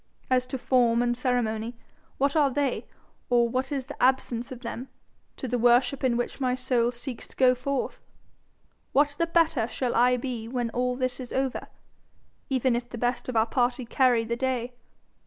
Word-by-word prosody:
As 255 0 +3
to 265 - -3
form 240 -2 +3
and 240 0 +1
ceremony, 240 -2 -1 0.4
what 280 +2 +1
are 295 -3 +4
they, 275 -1 -1 0.4
or 240 -1 +4
what 255 +3 -2
is 270 -3 -2
the 290 - -9
absence 250 -2 +1
of 250 -2 -8
them, 245 +1 -6 0.5
to 260 - -4
the 245 0 -1
worship 245 +3 +3
in 245 -2 +2
which 245 +3 -3
my 250 -1 +1
soul 250 -2 +1
seeks 245 0 -6
to - - -17
go 255 -1 +5
forth? 265 +2 -3 0.9
What 290 +2 +4
the 335 - +2
better 320 -8 +2
shall 250 0 -2
I 250 +1 +4
be 240 -3 -4
when 240 -1 -2
all 250 +1 0
this 255 0 -1
is 250 -2 -7
over, 265 -1 -2 0.8
even 260 -2 +2
if 240 0 -3
the 240 - -7
best 245 +2 -1
of 250 - -4
our 220 0 +4
party 245 +1 0
carry 245 -1 +3
the 235 +1 -2
day? 250 -1 -2
250 Hz, 185 wpm, -27 LUFS, 240-260 Hz, 0.9 s, go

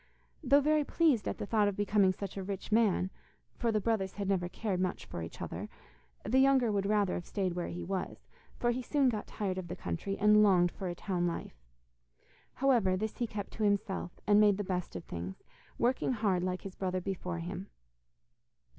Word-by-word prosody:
Though 280 +1 +5
very 305 +1 +3
pleased 290 -7 +2
at - - -2
the - - -4
thought 210 0 +2
of 205 - -1
becoming 205 -1 +3
such 190 0 -6
a 195 - -3
rich 195 +2 -5
man 210 -4 +3 0.5
for 235 -2 +1
the 215 - +2
brothers 205 -3 0
had 200 -1 -4
never 180 -3 0
cared 195 -1 -2
much 185 -1 -2
for 85 - -6
each 80 - -7
other - - -5 0.6
the 245 +6 +3
younger 265 -4 +4
would 200 -1 0
rather 205 -3 +2
have 175 - -4
stayed 190 -4 -1
where 175 0 -3
he 175 +1 -5
was, 185 +1 -4 0.3
for 240 - +1
he 250 +2 -2
soon 275 +1 +2
got 215 -3 -3
tired 190 -3 -3
of 180 - -6
the 175 - -5
country, 195 +2 -3
and 210 +1 +6
longed 180 -4 +5
for 190 - -5
a 175 - -3
town 175 -1 -1
life. 65 - -5 0.9
However, 235 -9 +3
this 215 +2 -3
he 240 - 0
kept 205 -2 -5
to 220 - -3
himself, 200 -3 -1
and 205 0 +6
made 205 -2 +5
the 205 - -2
best 180 - -3
of 90 - -5
things, 90 +2 -7 0.3
working 255 +2 +1
hard 205 -6 +1
like 185 0 -2
his 195 - -7
brother 185 -1 -2
before 180 -2 -4
him. 180 +3 -5
200 Hz, 205 wpm, -32 LUFS, 185-220 Hz, 0.9 s, and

